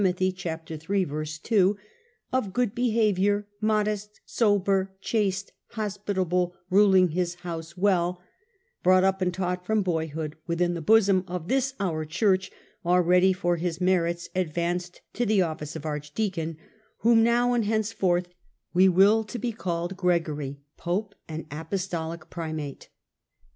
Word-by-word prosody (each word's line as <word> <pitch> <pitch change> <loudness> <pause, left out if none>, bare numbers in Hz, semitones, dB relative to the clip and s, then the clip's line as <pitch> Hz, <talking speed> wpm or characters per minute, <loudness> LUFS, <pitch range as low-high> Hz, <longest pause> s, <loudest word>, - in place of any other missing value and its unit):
iii. 185 0 +2 1.1
2), 200 -3 +3 0.3
" 470 - -33
of 215 -7 0
good 245 -2 +1
behaviour, 210 -4 +2 0.2
modest, 210 -1 0
sober, 195 -3 +2
chaste, 195 -2 -1 0.2
hospitable, 190 -4 -1 0.2
ruling 190 -2 +5
his 175 +1 -1
house 165 0 -6
well," 180 -2 +2 0.6
brought 185 0 +5
up 190 0 +2
and 180 -1 +2
taught 180 0 -2
from 215 +2 +1
boyhood 160 -3 -2
within 175 +1 +1
the 170 - -4
bosom 195 0 +4
of 180 -2 -5
this 270 0 +1
our 165 -5 -1
Church, 190 +4 +1 0.3
already 180 +1 +4
for 175 -2 0
his 170 0 -2
merits 175 -2 +1
advanced 175 0 -2
to 245 - -1
the 210 -4 +3
office 155 -2 -5
of 145 - -7
archdeacon, 160 +2 -3 0.4
whom 230 0 +5
now 240 +2 +3
and 235 -3 +1
henceforth 200 -5 +1 0.5
we 185 +2 +6
will 200 +5 +5
to 215 +3 -7
be 235 +1 -2
called 175 -3 -3
Gregory, 155 -6 0 0.2
Pope 200 +4 -2
and 160 0 -6
Apostolic 165 0 -4
Primate.' 155 -4 -5
185 Hz, 130 wpm, -26 LUFS, 170-205 Hz, 1.1 s, we